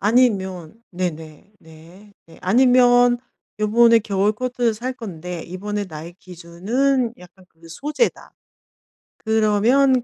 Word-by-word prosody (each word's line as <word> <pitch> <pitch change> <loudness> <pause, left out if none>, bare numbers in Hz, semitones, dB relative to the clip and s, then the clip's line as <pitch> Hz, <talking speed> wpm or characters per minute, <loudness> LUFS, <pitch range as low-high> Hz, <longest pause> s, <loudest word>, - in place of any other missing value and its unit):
아니면 195 -7 +1 0.2
네네네. 170 +1 -6 0.7
네. 165 - -17
아니면 245 +3 +4 0.4
요번에 230 +2 +5
겨울 205 0 0
코트를 245 0 -1
살 250 +4 -4
건데 180 -7 -7
이번에 205 +3 -5
나의 160 +1 -9
기준은 220 +10 -2
약간 180 +1 -17
그 165 -1 -19
소재다. 295 - -3 0.8
그러면 225 +4 +2
210 Hz, 225 characters per minute, -21 LUFS, 180-245 Hz, 0.8 s, 요번에